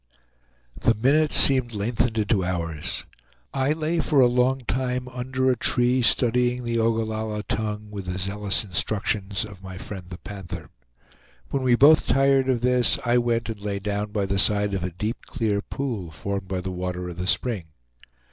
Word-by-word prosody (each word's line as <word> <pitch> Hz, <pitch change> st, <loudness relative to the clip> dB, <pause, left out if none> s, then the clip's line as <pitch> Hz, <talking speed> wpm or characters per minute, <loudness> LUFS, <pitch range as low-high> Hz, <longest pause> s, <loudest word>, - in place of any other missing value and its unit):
The 115 Hz, -, +2 dB
minutes 140 Hz, +7 st, +2 dB
seemed 130 Hz, -4 st, +4 dB
lengthened 115 Hz, +2 st, -1 dB
into 105 Hz, -2 st, +1 dB
hours. 85 Hz, -4 st, -3 dB, 0.5 s
I 135 Hz, +2 st, +1 dB
lay 160 Hz, +2 st, -1 dB
for 150 Hz, -3 st, +2 dB
a 130 Hz, -, +7 dB
long 125 Hz, +2 st, +2 dB
time 125 Hz, +2 st, -2 dB
under 130 Hz, +1 st, -1 dB
a -, -, +1 dB
tree, 125 Hz, +1 st, +2 dB
studying 125 Hz, +1 st, +3 dB
the 115 Hz, -1 st, -1 dB
Ogallalla 110 Hz, -1 st, -1 dB
tongue, 105 Hz, -1 st, -3 dB
with 100 Hz, -3 st, -7 dB
the 90 Hz, 0 st, -3 dB
zealous 100 Hz, -1 st, 0 dB
instructions 100 Hz, +1 st, 0 dB
of 100 Hz, -3 st, -12 dB
my 95 Hz, -1 st, -9 dB
friend 95 Hz, 0 st, -8 dB
the 90 Hz, -, -7 dB
Panther. 95 Hz, -2 st, -8 dB, 0.8 s
When 135 Hz, -, 0 dB
we 130 Hz, -1 st, +3 dB
were -, -, +4 dB
both 155 Hz, -, +2 dB
tired 135 Hz, -1 st, +3 dB
of 125 Hz, -3 st, +1 dB
this 125 Hz, 0 st, +3 dB
I 120 Hz, +1 st, +3 dB
went 120 Hz, -1 st, 0 dB
and 110 Hz, -2 st, -6 dB
lay 100 Hz, -1 st, -3 dB
down 105 Hz, +1 st, -3 dB
by 105 Hz, -2 st, -1 dB
the 95 Hz, 0 st, 0 dB
side 105 Hz, 0 st, +2 dB
of 95 Hz, -2 st, -2 dB
a 90 Hz, -, -1 dB
deep, 105 Hz, +7 st, -5 dB
clear 110 Hz, -7 st, -1 dB
pool 115 Hz, -9 st, -4 dB
formed 95 Hz, +5 st, -5 dB
by 95 Hz, -1 st, -3 dB
the 95 Hz, +1 st, -4 dB
water 90 Hz, 0 st, -4 dB
of 85 Hz, -1 st, -8 dB
the 90 Hz, 0 st, -3 dB
spring. 105 Hz, -4 st, 0 dB
110 Hz, 180 wpm, -24 LUFS, 95-125 Hz, 0.8 s, a